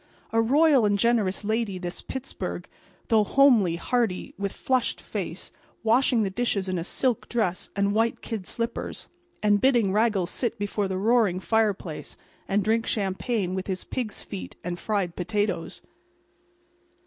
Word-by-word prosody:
A 225 0 +3
royal 280 +2 +5
and 205 -1 +3
generous 215 -4 +1
lady 215 -2 -1
this 175 -1 -5
Pittsburg, 265 0 -5 0.4
though—homely, 220 -4 +5
hearty, 225 0 -1
with 200 0 -3
flushed 255 -2 0
face, - - -5 0.3
washing 235 +1 +3
the 195 - -1
dishes 200 -3 -1
in 185 -1 -1
a - - -3
silk 245 +5 -1
dress 200 -7 -1
and 200 0 +1
white 225 +2 +1
kid 215 -6 -5
slippers, 230 0 -3 0.4
and 205 -1 +4
bidding 240 -7 +4
Raggles 210 -4 +2
sit 235 -2 -2
before 205 0 -1
the 190 -1 -2
roaring 210 -3 +3
fireplace 205 -6 -1 0.3
and 200 +1 +1
drink 225 +2 +1
champagne 195 -1 -1
with 190 0 -3
his 185 -2 -3
pigs' 235 -5 -4
feet 90 -1 -7
and 175 0 -4
fried 200 -5 -1
potatoes. 205 -2 -2
210 Hz, 145 wpm, -26 LUFS, 190-235 Hz, 0.4 s, royal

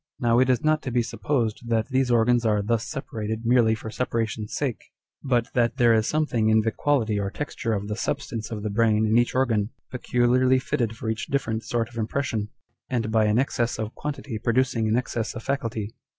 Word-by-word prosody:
Now 120 -2 +3
it 130 0 +3
is 125 -2 +2
not 155 0 +2
to 125 - -4
be 120 0 +2
supposed 115 -1 -2
that 115 0 +1
these 130 -1 +1
organs 120 0 +3
are 105 -2 +2
thus 115 +1 0
separated 110 -6 -4
merely 115 -2 +4
for 110 0 -7
separation's 115 -3 -2
sake, 135 -6 -2 0.4
but 120 -4 0
that 120 +1 +1
there 120 -3 +5
is 110 -1 +2
something 130 -8 +1
in 110 0 +5
the 115 +1 0
quality 115 -6 +1
or 100 -1 -1
texture 115 -2 -3
of 100 -1 -2
the 105 - -3
substance 110 0 -3
of 105 -2 -5
the 105 - -2
brain 110 0 +3
in 110 +1 +2
each 120 - 0
organ, 115 -5 +1 0.2
peculiarly 125 +1 +2
fitted 120 -4 -2
for 115 - -6
each 110 0 -2
different 115 -5 -1
sort 115 -2 -1
of 120 0 -13
impression, 110 -2 -2 0.4
and 115 -4 -1
by 110 -1 +3
an 105 +1 +2
excess 120 -2 0
of 110 0 -4
quantity 140 -6 -5
producing 120 -1 +1
an 110 - +2
excess 120 -3 -2
of 115 - -6
faculty. 115 -6 -3
115 Hz, 205 wpm, -25 LUFS, 110-125 Hz, 0.4 s, there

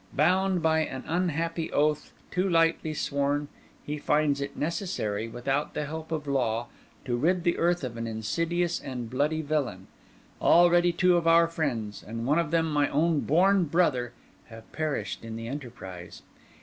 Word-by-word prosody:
Bound 180 +3 +2
by 160 0 +3
an 135 -4 -3
unhappy 165 -1 -1
oath, 150 0 +1 0.2
too 185 +2 0
lightly 165 -2 +2
sworn, 145 0 -1 0.4
he 150 +1 -4
finds 150 -1 +1
it 140 - -5
necessary, 150 - -2
without 135 +5 -2
the 150 - -1
help 160 +2 -7
of 155 -2 -2
law, 120 -5 -1 0.4
to 125 -3 -1
rid 170 +8 +1
the 175 -1 +2
earth 175 -1 +1
of 120 -2 -5
an 115 0 -3
insidious 165 +10 -1
and 125 -4 -6
bloody 150 +4 0
villain. 140 -11 -2 0.6
Already 175 0 +5
two 180 +1 +3
of 165 -1 0
our 165 0 +6
friends, 125 -11 -3
and 115 +2 -6
one 150 +5 +3
of 170 -3 0
them 165 0 +2
my 145 -1 +2
own 160 +1 +2
born 185 +5 +3
brother, 140 -7 +1 0.3
have 115 0 -13
perished 155 -6 -3
in 115 -1 -6
the 115 0 -6
enterprise. 115 -10 -8
150 Hz, 160 wpm, -27 LUFS, 125-170 Hz, 0.6 s, our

